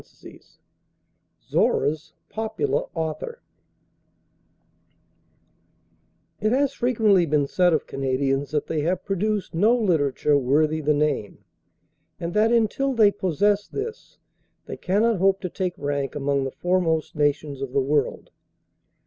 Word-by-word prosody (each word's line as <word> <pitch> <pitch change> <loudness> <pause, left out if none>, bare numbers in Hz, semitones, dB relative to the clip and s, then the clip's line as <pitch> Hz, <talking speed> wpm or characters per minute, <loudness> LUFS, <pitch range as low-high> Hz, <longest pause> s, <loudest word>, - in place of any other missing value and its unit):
("RALPH - - -27
CONNOR") - - -12 1.1
ZORRA'S 155 +1 +1 0.2
POPULAR 220 0 -2
AUTHOR 160 - -4 3.0
It 215 - +1
has 275 +2 +2
frequently 220 -9 +2
been 150 -1 +2
said 180 +5 +2
of 155 - 0
Canadians 135 +1 -1
that 150 0 -1
they 155 -2 -2
have 175 +4 -1
produced 200 +1 -1
no 215 +9 +3
literature 150 - +2
worthy 150 +4 +1
the 150 0 +2
name, 145 -9 -1 0.8
and 170 0 -4
that 215 +2 +3
until 240 +4 +1
they 215 -3 +5
possess 200 +2 0
this, 440 +2 -7 0.5
they - - -6
cannot 210 +4 +1
hope 195 +1 +2
to 180 - -3
take 180 0 -3
rank 140 -2 -3
among 140 -1 0
the 135 - -4
foremost 165 +1 0
nations 145 -1 -1
of 135 -2 -4
the 140 - +1
world. 140 0 -1
165 Hz, 125 wpm, -24 LUFS, 145-210 Hz, 3.0 s, they